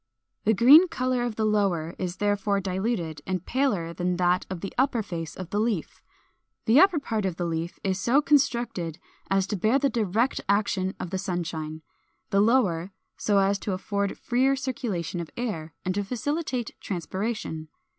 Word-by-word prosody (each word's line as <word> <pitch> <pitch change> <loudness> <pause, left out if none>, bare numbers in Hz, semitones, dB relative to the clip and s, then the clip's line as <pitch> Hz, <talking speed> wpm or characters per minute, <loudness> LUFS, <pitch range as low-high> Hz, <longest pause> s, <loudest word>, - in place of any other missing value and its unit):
The 220 +1 +4
green 285 - +8
color 255 -6 -1
of 240 -2 -2
the 220 - 0
lower 190 -6 +1
is 180 -1 -3
therefore 205 0 +1
diluted, 185 -5 -2
and 185 -2 -2
paler 205 -11 0
than 180 0 -1
that 180 0 +2
of 185 -3 -5
the 195 - -5
upper 250 -3 +1
face 165 -5 -5
of 185 -1 -7
the 205 - 0
leaf. 215 -7 -1 0.6
The 235 +5 +6
upper 375 -1 +6
part 225 -7 -2
of 190 -3 -1
the 175 - -2
leaf 165 +1 -3
is 190 -1 0
so 240 +8 +3
constructed 235 - +1 0.3
as 195 -1 +2
to 210 - -3
bear 215 +7 +3
the 280 0 +1
direct 225 +2 +1
action 200 -2 +1
of 180 - -5
the 190 - -1
sunshine; 160 -4 -4 0.5
the 195 - +4
lower 200 -7 +2 0.3
so 205 -2 +1
as 195 +1 +3
to 200 - -3
afford 200 +1 -2
freer 260 +3 +2
circulation 240 - -3
of 170 - -5
air, 165 -11 -4
and 185 - 0
to 205 +1 -1
facilitate 255 +2 -2
transpiration. 185 -2 -4
200 Hz, 175 wpm, -26 LUFS, 180-240 Hz, 0.6 s, green